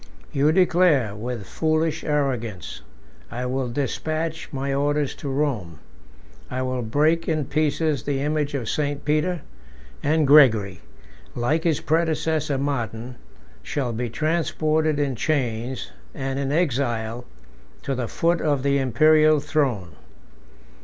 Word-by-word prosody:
You 145 +2 +3
declare, 165 - +3
with 115 -1 -5
foolish 155 - 0
arrogance, 125 - -2 0.5
I 125 +1 -4
will 130 0 -2
despatch 155 +5 -3
my 135 0 -2
orders 145 0 0
to 140 - -5
Rome: 130 - -2 0.7
I 130 0 -2
will 130 -1 -2
break 155 +9 +1
in 155 -3 0
pieces 155 0 0
the 140 -2 -2
image 150 0 -1
of 125 -5 -3
St. 145 +1 -2
Peter; 155 +3 +1 0.6
and 155 +1 +2
Gregory, 115 -10 +5 0.6
like 150 +8 0
his 160 -4 +1
predecessor 160 -2 0
Martin, 125 -3 -3 0.4
shall 130 -5 -2
be 120 +1 -3
transported 155 +1 0
in 140 -3 0
chains, 125 -2 -2 0.2
and 135 -1 -3
in 140 0 -1
exile, 120 -7 0 0.6
to 140 - -2
the 125 -3 -2
foot 170 +8 +1
of 145 -4 +1
the 140 0 +2
Imperial 155 +4 +4
throne. 140 - -1
140 Hz, 125 wpm, -23 LUFS, 125-155 Hz, 0.7 s, Gregory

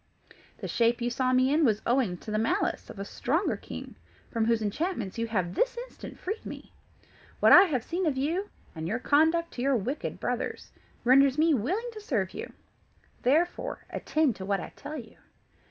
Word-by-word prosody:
The - - -5
shape 235 0 +2
you 240 0 -1
saw 255 +1 +1
me 255 +2 +3
in 315 +2 +3
was 220 -5 +2
owing 235 -8 +1
to 215 - -8
the 215 - +1
malice 225 - 0
of - - -9
a 195 - -4
stronger 320 - 0
king, - - -8 0.4
from 225 -2 +1
whose 230 -1 +2
enchantments 230 - -2
you 230 - 0
have 185 -6 -1
this - - +1
instant - - -10
freed 420 +4 -4
me. - - -9 0.7
What - - +6
I 380 - +10
have 265 - -1
seen 350 +4 -1
of 280 -4 0
you, 335 +9 -1 0.2
and 160 -1 -5
your 215 +7 0
conduct 320 +6 +3
to 245 - -5
your 275 +1 +3
wicked 245 +7 -3
brothers, - - -3 0.3
renders 270 +2 +5
me 320 +1 +4
willing 375 - -1
to 430 - -8
serve 220 - -1
you; - - -6 0.7
therefore, 340 - +1
attend 305 -7 +1
to 190 - -6
what 200 0 0
I - - -8
tell 305 +2 -7
you. 225 -5 -10
260 Hz, 190 wpm, -28 LUFS, 225-320 Hz, 0.7 s, I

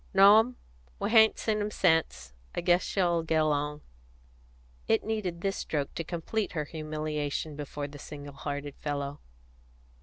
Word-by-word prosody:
"No, 200 +2 +9
'm. 245 +3 0 0.4
We - - -2
hain't 220 -1 +6
seen 215 -1 0
him 205 - -1
sence. 165 - +1 0.2
I - - -1
guess 175 +1 +4
she'll 175 -3 +1
get 160 -1 +1
along." 150 -1 0 1.1
It 225 - +3
needed 200 -6 -3
this 195 0 -1
stroke 145 -3 -2
to 165 - -3
complete 175 +6 -3
her 155 -3 -2
humiliation 155 -1 -3
before 145 0 -5
the 145 0 -11
single 145 0 -9
hearted 145 0 -5
fellow. 145 -1 -3
160 Hz, 150 wpm, -29 LUFS, 145-195 Hz, 1.1 s, No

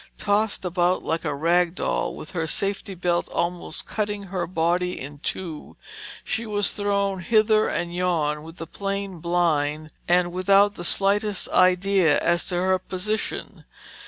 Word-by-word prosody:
Tossed 205 -1 0
about 180 +1 +1
like 165 +1 -1
a 145 - -1
rag 170 +3 +2
doll, - - -1
with - - -9
her 165 -3 -2
safety 195 +3 -2
belt 175 -1 0
almost 170 +1 -3
cutting 205 -2 -3
her 185 -2 -2
body 180 +1 0
in 145 +2 -8
two, 160 0 -6 0.5
she 230 - -2
was 205 -1 +1
thrown 200 -2 0
hither 215 +2 +3
and 175 0 -2
yon 165 -4 0
with 165 +2 -11
the 165 - -5
plane, 200 -1 -4
blind, 155 -3 0 0.2
and 175 0 +3
without 195 +2 +4
the 175 - -8
slightest 200 +2 +1
idea 185 -3 +4
as 170 +1 +1
to 180 - -2
her 185 +1 +2
position. 200 +4 -4
180 Hz, 150 wpm, -24 LUFS, 170-200 Hz, 0.5 s, without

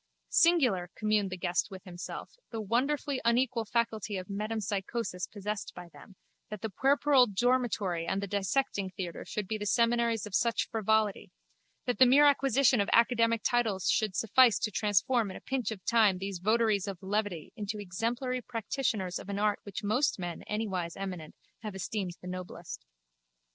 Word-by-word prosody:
Singular, 250 - +3
communed 215 -2 +1
the 185 - -5
guest 175 +1 0
with 190 -2 -10
himself, 175 -1 -7 0.2
the 225 - -5
wonderfully 260 +5 0
unequal 235 0 +1
faculty 220 -2 -1
of 185 +1 -7
metempsychosis 210 -1 -3
possessed 210 0 -5
by 175 -1 -9
them, 165 +7 -15 0.3
that 210 -2 -7
the 220 - -3
puerperal 275 +2 +4
dormitory 210 -6 0
and 195 - 0
the 200 - -2
dissecting 200 +1 -1
theatre 180 -2 -6
should 210 -3 -4
be 215 +1 -3
the 205 - -4
seminaries 235 0 +2
of 210 - -10
such 235 +3 +1
frivolity, 220 -2 +1 0.6
that 245 -4 -1
the 255 - +8
mere 280 +4 +6
acquisition 270 -4 +4
of 200 - -1
academic 230 -1 +3
titles 225 -7 +1
should 215 -4 0
suffice 235 +2 +5
to 215 - -2
transform 210 +3 +1
in 185 - -7
a - - -13
pinch 260 -5 -2
of 205 -5 -7
time 220 -5 +4
these 195 -1 -5
votaries 215 0 +2
of 195 -2 -4
levity 195 -5 -2
into 210 0 -4
exemplary 235 +6 -2
practitioners 225 -5 -2
of - - -10
an 200 - -3
art 210 0 +1
which 200 0 -7
most 235 +8 +1
men 175 -3 -5
anywise 190 -6 -3
eminent 185 -5 -6 0.2
have 215 -3 -7
esteemed 190 -1 -4
the 180 - -9
noblest. 180 - -7
210 Hz, 165 wpm, -30 LUFS, 190-235 Hz, 0.6 s, the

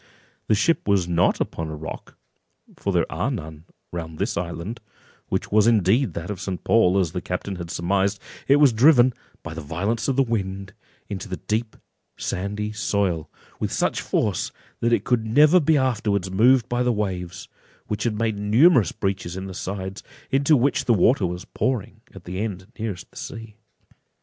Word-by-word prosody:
The 110 - +4
ship 165 +7 +1
was 100 -4 +2
not 85 0 +2
upon 80 - -3
a 80 - -5
rock, 80 +2 -8 0.6
for - - -2
there - - +2
are 125 - -1
none 80 - -6 0.3
round 80 -2 -6
this - - -1
island, 90 +6 -4 0.5
which - - -2
was 105 +1 +5
indeed 110 - +3
that 85 +4 -4
of 95 -3 -6
St. 95 -2 -4
Paul, 100 -5 +4
as 90 -5 +1
the 90 - -4
captain 90 +2 -4
had 85 -1 -6
surmised: 95 +4 0 0.3
it 140 - +6
was 145 -4 +5
driven, 125 +1 +6 0.3
by 85 - -6
the 80 - -6
violence 95 +10 -2
of 135 - +1
the 135 - +4
wind, 100 -5 -3 0.3
into 100 0 -6
the 90 - -3
deep 110 +1 -2 0.4
sandy 105 +3 -3
soil, 100 -7 -1 0.3
with - - -2
such - - 0
force, - - -1 0.3
that 115 - +1
it 115 -4 +2
could 115 -2 0
never 150 +10 +6
be 155 -1 +3
afterwards 105 -8 0
moved 120 +5 +4
by 120 0 -1
the 125 0 +2
waves, 90 -5 -3 0.4
which 105 0 -3
had 115 -3 -1
made 110 -2 -1
numerous 115 - +5
breaches 95 -2 -3
in 95 - -5
the 95 - -7
sides, 95 +2 -5 0.3
into 140 +3 +4
which 135 +3 +1
the 120 - +4
water 105 +1 +3
was 90 +2 -6
pouring 110 -4 -2
at 95 - -11
the 90 +1 -5
end 100 -4 -3
nearest 105 -5 -3
to - - -45
the - - -16
sea. 115 -2 -8
100 Hz, 185 wpm, -23 LUFS, 90-115 Hz, 0.6 s, it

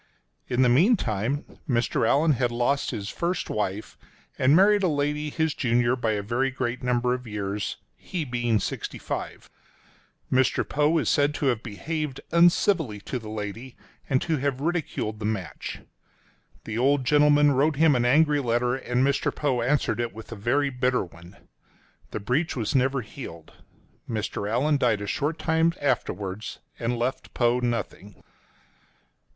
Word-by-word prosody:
In 125 +1 +2
the - - +5
meantime, 135 - +2 0.2
Mr. 120 -2 +1
Allan 155 +3 +4
had 125 -3 +1
lost 125 +4 0
his 100 0 -4
first 175 +1 -2
wife, 105 0 -3 0.4
and 135 +3 +5
married 205 +3 +5
a 190 - +2
lady 150 0 -1
his 160 0 0
junior 120 -1 +2
by 115 -3 0
a 100 -1 -2
very 120 +6 0
great 125 -2 -3
number 125 0 +1
of 125 -1 -5
years 105 -1 -3
— - - -46 0.2
he 170 -4 -1
being 120 -3 0
sixty - - -4
five. - - -5 0.8
Mr. 130 0 +2
Poe 150 +3 +2
is 155 - 0
said 145 0 +2
to - - -2
have 120 -5 +1
behaved 140 +5 -4
uncivilly 170 - +3
to 125 - -4
the 110 -2 -9
lady 110 +4 -6 0.3
and 130 -2 +2
to 160 -2 0
have 135 -1 -1
ridiculed 150 -9 -2
the 105 - -4
match. 105 -6 -4 0.8
The 110 +1 -4
old 135 +1 +2
gentleman 145 +1 +5
wrote 140 +3 +2
him 155 -1 +4
an 120 - +2
angry 150 +4 +4
letter, 120 -1 +1
and 125 0 0
Mr. 140 0 +1
Poe 135 -5 -1
answered 120 -3 +1
it 120 -2 -2
with 110 +1 -10
a - - -5
very 135 +7 +1
bitter 125 -3 0
one. 85 +2 -15 0.7
The - - -4
breach 125 +11 0
was 115 -5 -2
never 135 0 +2
healed. 105 - -10 0.6
Mr. 105 -2 -3
Allan 140 +6 +2
died 115 -6 +1
a - - -3
short 150 +9 -1
time 165 0 +1
afterwards, 105 -6 -2 0.2
and 120 0 -1
left 125 +3 -3
Poe 120 0 +2
nothing. 115 -4 -4
125 Hz, 160 wpm, -26 LUFS, 115-145 Hz, 0.8 s, the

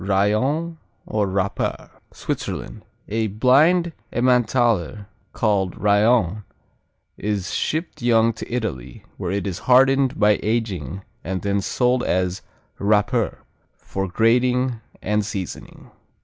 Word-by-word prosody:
Rayon 125 - 0 0.3
or 105 -2 0
Raper 95 0 -2 0.2
Switzerland - - -5 0.3
A 110 +1 -1
blind 145 - +3 0.2
Emmentaler 120 - +1 0.3
called 100 -4 0
Rayon 105 -1 +2 0.8
is 105 -3 -2
shipped 160 -1 -2
young 115 -1 +3
to - - -9
Italy, 110 - -4
where 90 - -4
it 100 +2 -2
is 95 -3 -3
hardened 135 +1 +4
by 105 -1 +4
aging 100 - -2 0.2
and 95 +1 -4
then 100 0 0
sold 125 +5 +1
as 90 +1 0 0.4
Raper, 105 +3 +1 0.3
for 95 0 -4
grating 125 +4 +2 0.2
and 105 0 +1
seasoning. 95 -3 -7
110 Hz, 105 wpm, -22 LUFS, 100-125 Hz, 0.8 s, hardened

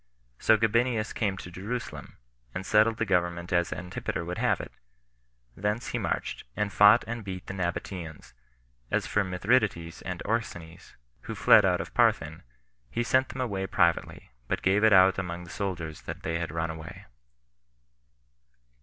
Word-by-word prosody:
So 110 - +5
Gabinius 115 0 +1
came 100 -4 -1
to 90 - -9
Jerusalem, 105 +7 -6 0.4
and 95 - -4
settled 110 +2 +4
the 115 - 0
government 85 -2 0
as 85 0 +2
Antipater 90 -1 -4
would 90 +1 -4
have - - +2
it; - - -7 0.8
thence 105 +4 -2
he - - -2
marched, - - -3
and 105 -1 -1
fought 105 +3 +7
and 115 -1 -5
beat 95 -2 -6
the - - -6
Nabateans: 85 -6 -5 0.6
as - - 0
for 105 - +1
Mithridates 95 -3 0
and 90 -1 -5
Orsanes, 85 -7 -4 0.3
who - - -5
fled - - +6
out - - +2
of - - -9
Parthin, 80 +4 +2 0.5
he 120 - -1
sent 130 +2 +2
them 130 - -5
away 100 -6 -2
privately, 85 -8 0 0.2
but - - -2
gave 100 +3 +3
it 110 - +6
out 95 -1 +6
among 90 -1 -4
the 85 - -11
soldiers 85 -6 -4
that - - -7
they 80 +1 -1
had 80 -2 -3
run 80 0 -2
away. 80 -1 -10
95 Hz, 160 wpm, -28 LUFS, 85-110 Hz, 0.8 s, fought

